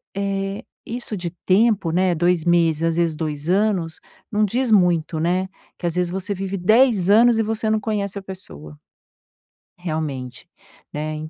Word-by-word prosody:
eh, 195 0 -2 0.2
isso 230 -3 -5
de 175 -2 -4 0.2
tempo, 200 -2 +3
né, 180 +1 +2
2 175 0 +1
meses, 165 -2 +2
às 165 -1 +1
vezes 170 -2 +1
2 150 0 -4
anos, 190 -5 +1 0.3
não 210 0 +2
diz 240 +3 -1
muito, 175 -5 +3
né, 180 +3 0 0.3
que - - -5
às 170 - -2
vezes 180 -1 0
você 190 +2 -3
vive 195 +1 -4
10 215 0 +3
anos 230 +2 +5
e - - +3
você 220 0 -1
não 220 - +2
conhece 205 -2 -3
a - - -11
pessoa. 75 - -10 1.0
Realmente, 150 -7 -5 0.5
né, 155 +1 -3
185 Hz, 160 wpm, -21 LUFS, 165-210 Hz, 1.0 s, anos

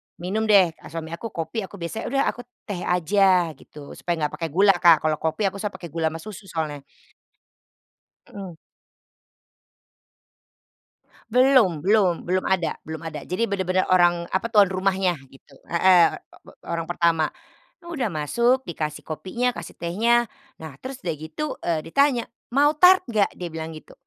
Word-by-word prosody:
minum 205 +6 -2
deh 195 -5 +5 0.2
suami 160 0 -7
aku 170 +7 -5
kopi, 190 +6 -4
aku - - -13
biasanya, 190 +5 -5
"Udah, 275 +2 +1
aku 245 0 -12 0.2
teh 200 -5 -5
aja," 180 0 +2
gitu. 145 -2 -13
Supaya 175 - -3
enggak 150 - -3
pakai 165 - -2
gula 195 +6 +5
Kak, 170 -4 +6
kalau 155 -1 0
kopi 160 +7 -2
aku 200 - -9
suka 205 -1 -4
pakai 175 -4 -9
gula 165 0 0
sama 160 +1 -4
susu 205 -2 -10
soalnya. 155 -4 -4 1.5
Mhm. 190 -4 -9 2.7
Belum 250 - +4
belum 195 -4 +2
belum 185 +1 +1
ada 180 -4 +1
belum 160 +1 -8
ada. 155 -2 -6
Jadi 185 +10 -1
bener-bener 185 -2 0
orang 175 -1 +3
apa 190 +5 0
tuan 210 -3 +6
rumahnya 190 -1 0 0.2
gitu, 135 +1 -20 0.2
heeh, 175 0 +4 0.2
o - - -16
bo - - -16
orang 165 0 -4
pertama, 165 -3 +2 0.6
udah 295 -10 -2
masuk 235 - +1
dikasih 155 -2 -5
kopinya, 235 +10 -2
kasih - - -9
tehnya. 230 +8 +2 0.3
Nah, 160 -2 -9
terus 260 0 -7
udah 170 - 0
gitu, 155 - -5
eee, 160 -3 -1
ditanya, 255 - +2 0.2
"Mau 285 +4 +3
tart 370 +1 +7
nggak?" 215 -5 +1
Dia 180 - -5
bilang 160 0 -5
gitu. - - -15
185 Hz, 155 wpm, -23 LUFS, 165-215 Hz, 2.7 s, tart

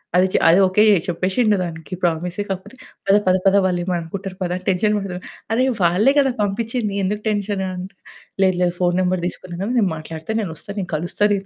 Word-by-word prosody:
అది 185 +1 +5
చ - - -1
అది 170 +4 +6
ఓకే 200 +3 +3 0.2
చెప్పేశిండు 190 +5 +1
దానికి. 165 -1 -7
ప్రామిస్సే. 175 +3 -1
కాకపోతే 195 +5 -5 0.3
పద 195 - +5
పద 185 - +5
పద 195 - +5
వాళ్ళేమన్నా 180 0 0
అనుకుంటారు 190 +3 -6
పద 180 -1 -1
అని 185 - -12
టెన్షన్ 210 +3 +2
పడతడు. 185 -3 -5 0.3
అరె 250 +3 +3 0.2
వాళ్ళే 190 +10 +4
కదా! 270 -2 +3
పంపిచ్చింది 215 +1 -1
ఎందుకు 210 +2 -2
టెన్షన్ 205 -2 -1
అంటె, 185 +1 -7 0.5
లేదు 185 -1 +3
లేదు 175 0 0
ఫోన్ 175 0 +2
నంబర్ 185 -1 0
తీసుకున్నా 175 -1 -7
గదా! 205 +4 -2
నేను 200 -4 +2
మాట్లాడత, 160 +7 -5
నేనొస్తా, 170 -1 -7
నేను 185 - -4
కలుస్తా 175 +6 -2
నిన్ను 195 -1 -2
185 Hz, 190 wpm, -20 LUFS, 175-205 Hz, 0.5 s, అది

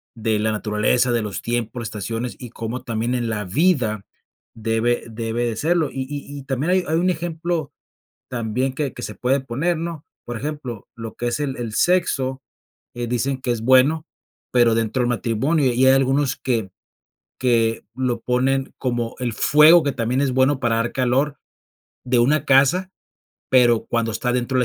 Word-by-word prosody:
de 110 -2 0
la 110 +1 +1
naturaleza, 110 +3 +1
de 120 -1 +1
los 105 -2 -4
tiempos, 120 0 -3
estaciones 115 +3 -4
y 125 -3 -8
cómo 120 +2 -5
también 115 +1 -2
en 120 -2 -1
la 105 -2 -2
vida 120 - +1 0.5
debe 115 +2 0
debe 115 +1 -2
de 115 - -2
serlo. 160 +4 +1
Y 135 - -3
y 145 0 -6
y - - -10
también 135 +6 -1
hay 185 -1 +3
hay 160 - 0
un 180 +2 +2
ejemplo 165 -2 -2 0.6
también 125 +2 -2
que 140 -3 -2
que - - -8
se 105 - -5
puede 130 +7 +1
poner, 145 +7 -1
¿no?, 165 -2 -5 0.2
por 120 -1 -4
ejemplo, 135 -5 -6
lo 115 -1 -7
que 120 - -2
es 120 - -2
el 140 -3 -2
el 115 -3 -5
sexo, 135 -7 +1 0.5
eh, 120 0 -3
dicen 130 +2 -1
que 130 - -2
es 115 -2 -4
bueno, 130 +6 +4 0.5
pero 120 -2 +4
dentro 115 +3 0
del 120 - +1
matrimonio, 130 +4 +1
y 130 +2 +3
hay 135 - +7
algunos 135 +1 +2
que 115 -7 -2 0.7
que 115 -3 +1
lo 125 -3 -1
ponen 130 +2 0
como 120 -2 -2
el 120 -2 -2
fuego 155 +3 +6
que 145 - 0
también 125 +2 -1
es 135 -2 +1
bueno 130 +1 +2
para 115 -2 +1
dar 115 +1 -1
calor 135 +3 0 0.7
de 125 0 +2
una 145 +6 +2
casa, 140 +8 +4 0.6
pero 120 -3 +4
cuando 115 -1 -1
está 115 +3 -1
dentro 125 +1 0
de - - +3
125 Hz, 180 wpm, -21 LUFS, 115-140 Hz, 0.7 s, hay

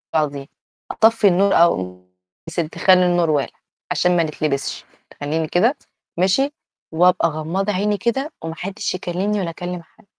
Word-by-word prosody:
آه 155 - +4
دي 140 0 -8 0.4
أطفي 225 -2 +4
النور 195 +2 +3
أو 90 - +2 0.4
يا - - -7
سِتي 165 -2 -3
خلّي 185 -1 +5
النور 175 -2 +2
والع 145 -2 -1 0.3
عشان 180 0 +2
ما 170 - +3
نتلبسش 150 -3 -3 0.4
أمين 155 +2 -1
كده 235 - +2 0.4
ماشي؟ 195 +11 +2 0.4
وأبقى 180 0 +4
غمضة 170 +7 -2
عيني 205 +2 0
كده 270 +8 -1
وما 165 0 -5
حدش 190 +3 -4
يكلمني 185 +4 -2
ولا 175 - -2
أكلم 175 +1 -6
حد. 165 - -26
180 Hz, 155 wpm, -20 LUFS, 160-200 Hz, 0.4 s, خلّي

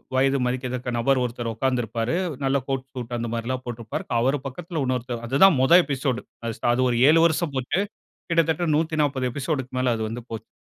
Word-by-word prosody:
வயது 135 +1 +3
மதிக்கத்தக்க 125 0 -2
நபர் 130 +2 +2
ஒருத்தர் 120 -1 -3
உட்கார்ந்திருப்பாரு. 120 +1 -1 0.3
நல்ல 135 +1 +2
கோட் 135 -1 -2
சூட் 120 -2 -5
அந்த 115 0 -3
மாரிலாம் 125 +2 -3
போட்டிருப்பாரு. 115 -2 -5
அவர் 135 +4 +2
பக்கத்தில 155 +4 -5
இன்னொருத்தர் 125 -2 -2
அது 135 +6 0
தான் 160 -9 +5
முதல் 170 +7 +7
எபிசோடு 135 -3 -2 0.2
அது 115 - -3
ச - - -4 0.2
ஒரு 120 - +1
7 165 +1 +6
வருஷம் 160 -2 +1
போச்சு. 130 +9 0 0.5
கிட்டத்தட்ட 165 0 +2
140 150 -5 0
எபிசோடுக்கு 135 -2 -3
மேல 125 -1 +2
அது 110 - -3
வந்து 120 +1 -6
போச்சு. 110 -1 -7
130 Hz, 175 wpm, -24 LUFS, 120-140 Hz, 0.5 s, முதல்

